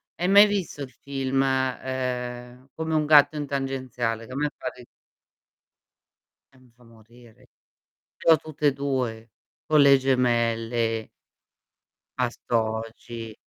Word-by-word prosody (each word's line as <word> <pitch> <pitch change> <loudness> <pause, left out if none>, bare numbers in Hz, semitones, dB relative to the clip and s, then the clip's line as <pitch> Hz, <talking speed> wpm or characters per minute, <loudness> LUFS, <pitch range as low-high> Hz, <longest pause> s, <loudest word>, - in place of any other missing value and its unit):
hai 180 - -1
mai 200 +2 +8
visto 190 -8 -3
il 130 - -9
film, 135 -1 -2
ehm, 125 -1 -3
Come 160 0 -3
un 155 -1 +2
gatto 150 0 +6
in 145 -1 -4
tangenziale? 130 -5 -3
Che - - -13
a - - -7
me 150 +1 0
fa - - -7
ri 125 -1 -14 1.7
Eh, - - -22
mi 125 -2 -23
fa 125 - -23
morire. 115 0 -20 0.7
Ce - - 0
l'ho 160 - +8
tutte 150 -1 -2
e 140 - +3
2, 125 -5 -3 0.3
con 155 -1 +3
le 140 -1 +7
gemelle. 115 -3 0 1.1
Bastogi, 115 -1 -3
130 Hz, 130 wpm, -25 LUFS, 115-140 Hz, 1.7 s, mai